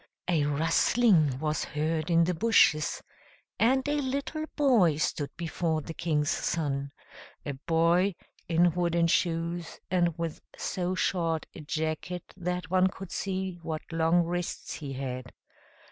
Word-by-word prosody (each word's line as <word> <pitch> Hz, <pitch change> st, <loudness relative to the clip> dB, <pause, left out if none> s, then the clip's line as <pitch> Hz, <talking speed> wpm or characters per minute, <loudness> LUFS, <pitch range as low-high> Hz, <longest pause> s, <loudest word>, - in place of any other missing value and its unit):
A 165 Hz, -5 st, +2 dB
rustling 160 Hz, -, +3 dB
was 155 Hz, +2 st, -1 dB
heard 155 Hz, +1 st, -2 dB
in 170 Hz, 0 st, +5 dB
the 180 Hz, +2 st, +1 dB
bushes, 165 Hz, -5 st, +3 dB, 0.6 s
and 260 Hz, +4 st, +3 dB
a 290 Hz, 0 st, +1 dB
little 280 Hz, +4 st, -2 dB
boy 230 Hz, -, +4 dB
stood 150 Hz, -2 st, -1 dB
before 165 Hz, -1 st, -1 dB
the 165 Hz, -, -6 dB
King's 150 Hz, -3 st, 0 dB
Son, 140 Hz, -4 st, -1 dB, 0.5 s
a 145 Hz, -, -2 dB
boy 170 Hz, +6 st, +2 dB, 0.3 s
in 170 Hz, +1 st, +4 dB
wooden 170 Hz, -1 st, +1 dB
shoes, 170 Hz, 0 st, 0 dB
and 175 Hz, -2 st, +2 dB
with 165 Hz, -2 st, -4 dB, 0.2 s
so 185 Hz, 0 st, -2 dB
short 165 Hz, -4 st, 0 dB
a -, -, -10 dB
jacket 160 Hz, +3 st, -3 dB
that 180 Hz, -1 st, -3 dB
one 185 Hz, 0 st, +4 dB
could 190 Hz, 0 st, -8 dB
see 190 Hz, -2 st, -3 dB
what 160 Hz, -1 st, -4 dB
long 165 Hz, +1 st, +3 dB
wrists 175 Hz, +1 st, -3 dB
he 140 Hz, -3 st, -6 dB
had. 130 Hz, -1 st, -5 dB
170 Hz, 135 wpm, -29 LUFS, 155-180 Hz, 0.6 s, in